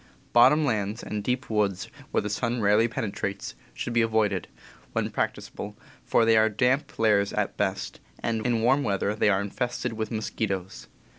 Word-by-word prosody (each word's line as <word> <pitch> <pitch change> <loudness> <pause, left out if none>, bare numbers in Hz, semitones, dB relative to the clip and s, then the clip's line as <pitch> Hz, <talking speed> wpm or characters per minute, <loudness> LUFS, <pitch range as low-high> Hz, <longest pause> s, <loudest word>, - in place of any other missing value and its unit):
Bottom 135 +6 +6
lands, 105 -4 -1
and 105 -1 -4
deep 125 +3 -1
woods 100 -3 0 0.2
where - - +1
the 105 - -3
sun 120 +3 -1
rarely 105 +2 +4
penetrates, 100 -3 -4 0.2
should 120 - -4
be 115 - +4
avoided, 110 -5 +1 0.5
when - - -1
practicable, - - -4 0.3
for 115 - +3
they 115 0 +5
are 110 0 +5
damp 130 +6 0
lairs 105 -3 +3
at - - -1
best, - - -2 0.2
and 115 -1 -2
in 115 -2 +1
warm 135 +4 +4
weather 100 -3 0
they 105 -1 +2
are 95 -1 +2
infested 120 +3 -3
with 110 -1 -3
mosquitoes. 95 - -3
110 Hz, 165 wpm, -26 LUFS, 100-120 Hz, 0.5 s, Bottom